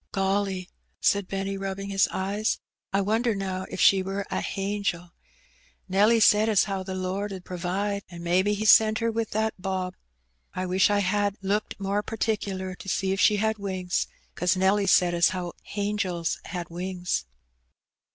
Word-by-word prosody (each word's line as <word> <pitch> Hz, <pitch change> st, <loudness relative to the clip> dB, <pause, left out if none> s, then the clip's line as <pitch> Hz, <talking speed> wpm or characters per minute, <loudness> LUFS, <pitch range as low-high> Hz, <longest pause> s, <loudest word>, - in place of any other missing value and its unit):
'^ -, -, -65 dB
Golly! 195 Hz, -1 st, -1 dB
" -, -, -45 dB
said 200 Hz, -2 st, +2 dB
Benny, 195 Hz, 0 st, -3 dB
rubbing 195 Hz, 0 st, -4 dB
his 195 Hz, -1 st, +3 dB
eyes, 200 Hz, +3 st, -1 dB, 0.2 s
" -, -, -66 dB
I 195 Hz, +1 st, +2 dB
wonder 220 Hz, +3 st, +1 dB
now 190 Hz, -1 st, -3 dB
if -, -, -6 dB
she 195 Hz, -1 st, +6 dB
wur 195 Hz, +1 st, -3 dB
a -, -, -1 dB
hangel. 195 Hz, -3 st, -2 dB, 0.8 s
Nelly 205 Hz, +5 st, +4 dB
said 215 Hz, 0 st, +5 dB
as 210 Hz, -2 st, +3 dB
'ow 195 Hz, -1 st, -2 dB
the 190 Hz, 0 st, -5 dB
Lord 190 Hz, +2 st, -2 dB
'ud 185 Hz, -2 st, -7 dB
pro 180 Hz, -, -6 dB
vide. 200 Hz, +3 st, -1 dB
An* 170 Hz, -1 st, -9 dB
mebbe 180 Hz, +3 st, +2 dB
He 210 Hz, +1 st, 0 dB
sent 220 Hz, 0 st, +6 dB
her 230 Hz, 0 st, 0 dB
with 225 Hz, -1 st, -2 dB
that 220 Hz, +1 st, 0 dB
bob. 185 Hz, -1 st, -2 dB, 0.6 s
I 185 Hz, -, -2 dB
wish 185 Hz, +2 st, +3 dB
I 205 Hz, 0 st, +2 dB
had 205 Hz, +1 st, 0 dB
looked 205 Hz, +2 st, -1 dB
more 200 Hz, +1 st, 0 dB
particler 200 Hz, -4 st, -2 dB
to 195 Hz, -, -9 dB
see 190 Hz, 0 st, 0 dB
if 195 Hz, -, -3 dB
she 210 Hz, -, +5 dB
had 220 Hz, +1 st, 0 dB
wings, 185 Hz, -3 st, -2 dB, 0.3 s
'cause 180 Hz, +1 st, +1 dB
Nelly 195 Hz, +2 st, +3 dB
said 180 Hz, -1 st, +4 dB
as 170 Hz, 0 st, +4 dB
how 180 Hz, -2 st, -4 dB, 0.2 s
hangels 200 Hz, -5 st, -1 dB
had 175 Hz, -2 st, -5 dB
wings." 180 Hz, -, -2 dB
195 Hz, 180 wpm, -26 LUFS, 185-205 Hz, 0.8 s, she